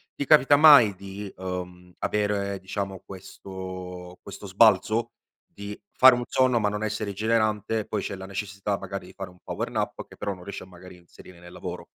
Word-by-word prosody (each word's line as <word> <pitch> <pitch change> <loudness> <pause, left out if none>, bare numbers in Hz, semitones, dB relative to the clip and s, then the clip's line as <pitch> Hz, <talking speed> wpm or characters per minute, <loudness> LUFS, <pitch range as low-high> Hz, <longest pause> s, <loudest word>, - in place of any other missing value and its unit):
Ti 140 - -3
capita 145 -1 +6
mai 140 -9 +8
di, 100 +1 -8
uhm, 90 -1 -6
avere 100 -2 -1
diciamo 95 0 -5
questo 95 -1 -9
questo 100 0 -10
sbalzo? 110 +3 +3 0.3
Di 100 0 -9
fare 130 0 +7
un 120 - -3
sonno, 130 -2 +2
ma 105 -1 +1
non 105 +1 -4
essere 105 -1 -2
rigenerante, 110 +1 0
e 105 - -4
poi 105 - -3
c'è 100 - -4
la 95 0 -9
necessità 100 0 -3
magari 95 -2 -7
di - - -14
fare 95 -1 -7
un 90 - -21
power - - -4
nap - - -3
che - - -15
però 100 - -3
non 90 - -13
riesce 100 +1 -7
a - - -14
magari 90 0 -14
inserire 85 0 -16
nel 85 0 -13
lavoro? - - -7
100 Hz, 190 wpm, -26 LUFS, 95-110 Hz, 0.3 s, mai